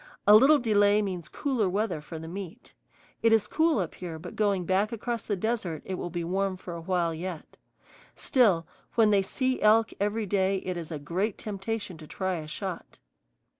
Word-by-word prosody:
A 205 Hz, -, +8 dB
little 270 Hz, +8 st, +8 dB
delay 210 Hz, -4 st, +3 dB
means 180 Hz, -4 st, -4 dB
cooler 255 Hz, -9 st, 0 dB
weather 200 Hz, -4 st, -1 dB
for 160 Hz, +2 st, -8 dB
the 160 Hz, +1 st, -8 dB
meat. 195 Hz, +6 st, -8 dB, 0.5 s
It 230 Hz, -, +4 dB
is 220 Hz, -2 st, +4 dB
cool 320 Hz, -1 st, +2 dB
up 180 Hz, -6 st, -2 dB
here, 170 Hz, -3 st, -7 dB
but 175 Hz, +2 st, -9 dB
going 200 Hz, -4 st, +1 dB
back 195 Hz, +5 st, +1 dB
across 235 Hz, 0 st, -3 dB
the 205 Hz, -, 0 dB
desert 195 Hz, -5 st, -2 dB
it 190 Hz, -, -4 dB
will 180 Hz, -1 st, -4 dB
be 175 Hz, 0 st, -3 dB
warm 190 Hz, +2 st, -1 dB
for 180 Hz, -1 st, -8 dB
a 170 Hz, -, -6 dB
while 170 Hz, -1 st, 0 dB
yet. 170 Hz, 0 st, -6 dB, 0.6 s
Still, 205 Hz, -, +3 dB, 0.3 s
when 220 Hz, -2 st, +5 dB
they 200 Hz, -1 st, +4 dB
see 255 Hz, +6 st, -1 dB
elk 220 Hz, +1 st, +4 dB
every 210 Hz, +2 st, 0 dB
day 195 Hz, 0 st, +1 dB
it 185 Hz, -1 st, -2 dB
is 170 Hz, -2 st, -6 dB
a 160 Hz, -, -4 dB
great 185 Hz, +8 st, -2 dB
temptation 200 Hz, -3 st, -5 dB
to 155 Hz, -, -11 dB
try 190 Hz, +1 st, -2 dB
a 155 Hz, -1 st, -7 dB
shot. 185 Hz, +2 st, -6 dB
195 Hz, 195 wpm, -28 LUFS, 175-220 Hz, 0.6 s, A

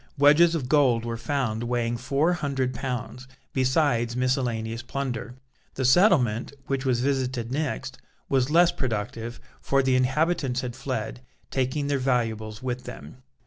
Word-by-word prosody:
Wedges 150 Hz, +4 st, +6 dB
of 140 Hz, -6 st, -2 dB
gold 125 Hz, -5 st, +3 dB
were 115 Hz, 0 st, -3 dB
found 120 Hz, -3 st, -2 dB
weighing 120 Hz, -1 st, -1 dB
four 140 Hz, +8 st, +1 dB
hundred 135 Hz, -6 st, -1 dB
pounds, 125 Hz, 0 st, -5 dB, 0.3 s
besides 130 Hz, -3 st, +1 dB
miscellaneous 120 Hz, -3 st, -1 dB
plunder. 125 Hz, -2 st, -4 dB, 0.4 s
The 130 Hz, -, -1 dB
settlement, 130 Hz, -, +4 dB
which 135 Hz, 0 st, -2 dB
was 120 Hz, -2 st, +2 dB
visited 130 Hz, -3 st, -1 dB
next, 135 Hz, -2 st, -3 dB, 0.3 s
was 135 Hz, -1 st, +1 dB
less 170 Hz, +2 st, +5 dB
productive, 115 Hz, -1 st, -4 dB, 0.2 s
for 135 Hz, 0 st, +2 dB
the 130 Hz, -1 st, +2 dB
inhabitants 135 Hz, 0 st, +1 dB
had 120 Hz, -2 st, -5 dB
fled, 130 Hz, -3 st, -4 dB, 0.3 s
taking 130 Hz, +2 st, 0 dB
their 140 Hz, -1 st, 0 dB
valuables 115 Hz, -4 st, -1 dB
with 125 Hz, -1 st, -3 dB
them. 75 Hz, -, -10 dB
130 Hz, 140 wpm, -26 LUFS, 120-140 Hz, 0.4 s, Wedges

